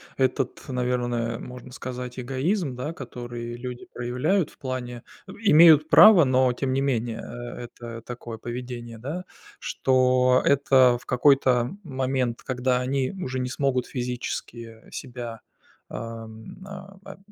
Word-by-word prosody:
этот, 130 0 0
наверное, 120 -2 -1
можно 125 0 -10
сказать, 125 0 -6
эгоизм, 135 - -1
да, 150 +6 -4
который 120 -4 -7
люди 125 0 -7
проявляют 135 +9 0
в - - -23
плане 125 -2 -5 0.3
имеют 160 -6 +6
право, 200 -8 +9
но 130 -1 +3
тем 130 +1 -2
не 135 - +1
менее, 120 -4 -1
э, 120 0 -7
это 115 -1 -9
такое 120 -2 -7
поведение, 120 -1 -7
да, 155 +9 -5 0.3
что 130 -1 +2
это 130 -3 +5
в - - -20
какой-то 125 -2 +3
момент, 130 -4 -2
когда 125 -1 0
они 130 +1 0
уже 130 -10 -4
не 125 0 -2
смогут 130 -2 0
физически 120 -2 -5
себя, 120 -4 -7 0.5
ам, 115 - -8 0.5
об 195 - -10
125 Hz, 125 wpm, -25 LUFS, 120-135 Hz, 0.5 s, право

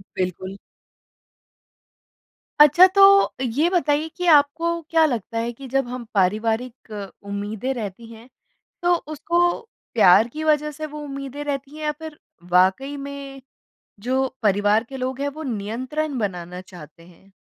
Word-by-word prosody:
बिल्कुल। 185 +1 -4 2.0
अच्छा, 300 +5 +8
तो 395 +1 +6
ये 275 +8 +1
बताइए 315 -4 +1
कि 360 - -3
आपको 330 +4 +1
क्या 325 -1 +4
लगता 230 -4 -3
है 230 +1 -1
कि 265 +3 -11
जब 270 -1 0
हम 245 -1 -6
पारिवारिक 220 +5 -1 0.3
उम्मीदें 205 +5 -4
रहती 225 -1 -7
हैं 225 +2 -14 0.6
तो 350 0 +4 0.2
उसको 340 +3 -1 0.6
प्यार 215 0 +6
की 310 +1 -5
वज़ह 300 -1 +2
से 310 +1 -6
वो 300 0 -9
उम्मीदें 275 0 -6
रहती 280 0 -4
हैं 310 - -8
या 300 - 0
फिर 315 -2 -9 0.3
वाक़ई 190 +11 +2
में 275 -1 -8 0.6
जो 260 +4 0 0.2
परिवार 205 +2 +2
के 270 - -7
लोग 260 +1 -4
हैं 285 - 0
वो 315 - -5
नियंत्रण 255 +5 -3
बनाना 180 -3 -4
चाहते 170 -3 -14
हैं? 185 +3 -21
260 Hz, 140 wpm, -22 LUFS, 210-300 Hz, 2.0 s, अच्छा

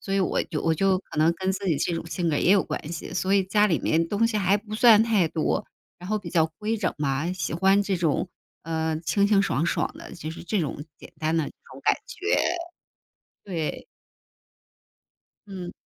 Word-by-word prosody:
所 195 - -3
以 195 - +2
我 185 - +1
就 155 - -4
我 165 -1 +2
就 190 +2 +2
可 155 - -9
能 160 +2 +4
跟 190 +1 -1
自 195 +1 -4
己 165 -6 +2
这 175 - -1
种 165 - -4
性 170 0 -1
格 150 - +1
也 175 - +2
有 195 -2 +5
关 155 - -5
系， 160 - -6
所 190 +2 +1
以 195 - +3
家 210 +3 +3
里 170 -6 +1
面 165 +1 +1
东 210 +4 +2
西 220 -2 0
还 195 0 +3
不 210 +1 -8
算 225 -2 +7
太 215 -7 +2
多， 155 -1 -1 0.3
然 180 - -9
后 215 0 +1
比 - - -8
较 160 -2 +3
规 220 +2 -1
整 185 -4 0
嘛， 145 +3 -1
喜 180 -4 -3
欢 190 +4 +3
这 200 -1 -1
种， 170 +1 0 0.3
呃， 160 -1 -1
清 170 +5 +2
清 205 -1 +4
爽 155 -5 0
爽 - - 0
的 - - -10
就 155 -2 -6
是 165 - -8
这 195 +2 -1
种 145 -1 -3 0.2
简 - - -13
单 160 +1 +1
的 160 - +1
这 - - -7 0.2
种 - - -11
感 - - +5
觉。 445 -3 -1 1.1
对。 165 -6 -4 1.6
嗯。 185 -3 -7
185 Hz, 230 characters per minute, -25 LUFS, 160-200 Hz, 1.6 s, 算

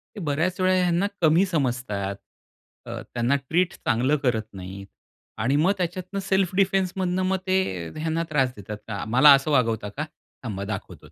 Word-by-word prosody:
ते - - -7
बऱ्याच 165 +3 -1
वेळा 185 0 +4
ह्यांना 180 +1 +2
कमी 165 +4 +5
समजतात, 125 - -1 0.7
अ, - - -6
त्यांना 120 +3 +2
ट्रीट 165 +6 0
चांगलं 130 +5 +1
करत 110 -4 0
नाहीत 95 +1 -8 0.5
आणि 130 +5 +2
मग 160 +6 +4
त्याच्यातनं 185 +2 -3
सेल्फ 190 -1 0
डिफेंसमधनं 190 -1 +1
मग 190 0 +1
ते 95 - 0
ह्यांना 160 +1 -1
त्रास 135 -4 +1
देतात 105 +1 -7
का 105 -2 -4
"मला 130 +6 +7
असं 140 +2 +2
वागवता 115 -6 +1
का? 150 - -1 0.4
थांबा 100 -5 -4
दाखवतोच." 100 -1 -7
150 Hz, 155 wpm, -25 LUFS, 115-185 Hz, 0.7 s, मला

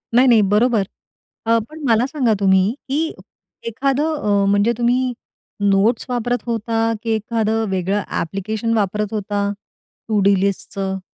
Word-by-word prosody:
नाही, 255 +2 +6
नाही, 230 -3 +6
बरोबर. 210 +2 +2 0.6
अ, 230 0 +4
पण 310 0 -11
मला 225 +2 +4
सांगा 260 -6 +1
तुम्ही 190 +2 +3 0.2
की 315 +4 0 0.6
एखादं 275 +6 0
अ, 200 -1 +2
म्हणजे 205 +4 +3
तुम्ही 245 +1 +1 0.6
नोट्स 205 +4 +2
वापरत 245 0 -1
होता, 225 0 0
की 225 - -1
एखाद 220 0 -1 0.2
वेगळं 190 +2 0
ॲप्लिकेशन 215 +6 -2
वापरत 210 +1 -1
होता? 205 -1 -1 0.6
टू 215 -2 +1
डू 200 +1 +4
लिस्टचं? 195 -1 -2
220 Hz, 135 wpm, -20 LUFS, 200-240 Hz, 0.6 s, नाही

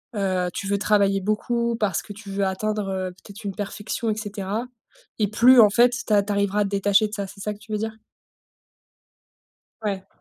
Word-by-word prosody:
heu, 185 -3 0
tu 195 - -4
veux 200 0 +1
travailler 200 -1 +3
beaucoup, 235 +3 0
parce 200 -6 0
que 205 - -10
tu 205 -1 -11
veux 195 0 0
atteindre, 210 +2 -1
heu, 185 -1 -2
peut-être 200 +4 -13
une 195 -2 -4
perfection 205 +2 -3
et 215 - 0
cetera 205 +1 -4 0.5
et 210 - +3
plus 240 +3 +6
en 210 - +7
fait 240 +4 +5 0.2
tu - - -4
a 205 - +6
tu 205 0 -2
arriveras 200 0 +1
à - - +4
te - - -3
détacher 205 +1 +3
de 210 - -13
ça. 200 -2 -3
C'est 195 - -13
ça 210 +1 -2
que 205 - -15
tu 220 0 -14
veux 210 - 0
dire? 220 0 -3 1.9
Ouais. 195 -3 -3
205 Hz, 210 wpm, -24 LUFS, 195-215 Hz, 1.9 s, en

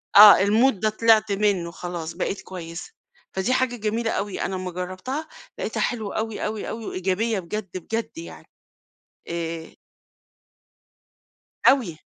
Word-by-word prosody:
آه، 205 -1 +10
الmood 230 +6 +4
ده 215 - +2
طلعت 220 -1 +4
منه 195 -4 +1
خلاص، 170 -2 -5
بقيت 195 +2 -3
كويسة. 170 - -8 0.4
فدي 190 +7 0
حاجة 255 -1 +1
جميلة 225 +1 -1
أوي. 200 -1 -2
أنا 190 - -2
أما 185 -1 -4
جربتها، 185 - -4 0.3
لقيتها - - -2
حلوة 220 -5 -2
أوي، 220 -1 -2
أوي، 215 0 -3
أوي، 225 -1 -5
وإيجابية 195 +4 0
بجد، 185 +1 -5
بجد 225 - -4
يعني. 335 - -10 0.8
آآ 165 -1 -4 1.9
أوي. 230 - +2
205 Hz, 130 wpm, -24 LUFS, 180-225 Hz, 1.9 s, آه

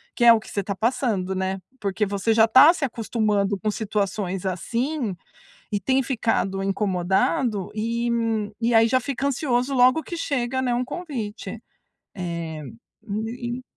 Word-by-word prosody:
que 240 - 0
é 235 - +10
o 230 - +5
que 220 - -13
você 200 - -2
está 200 +1 -4
passando, 215 -4 0
né. 190 0 -2 0.2
Porque 205 +1 0
você 200 +3 0
já 220 0 +6
está 260 +9 +8
se 295 - -1
acostumando 215 -4 0
com 215 - -1
situações 200 -3 -2
assim 235 - -2 0.6
e 205 - 0
tem 260 +7 +1
ficado 225 -6 0
incomodado, 195 +2 0
e 230 +2 -1 0.5
e 235 +1 +2
aí 225 0 +6
já 255 +2 +3
fica 270 +1 -3
ansioso 260 -1 0
logo 255 +5 +4
que 345 - -6
chega, 260 -4 -1
né, 250 -2 0
um 245 +1 -1
convite. 230 - -5 0.6
É, 170 -4 -4 0.5
e 235 +4 -3
e - - -11
225 Hz, 155 wpm, -24 LUFS, 195-250 Hz, 0.6 s, é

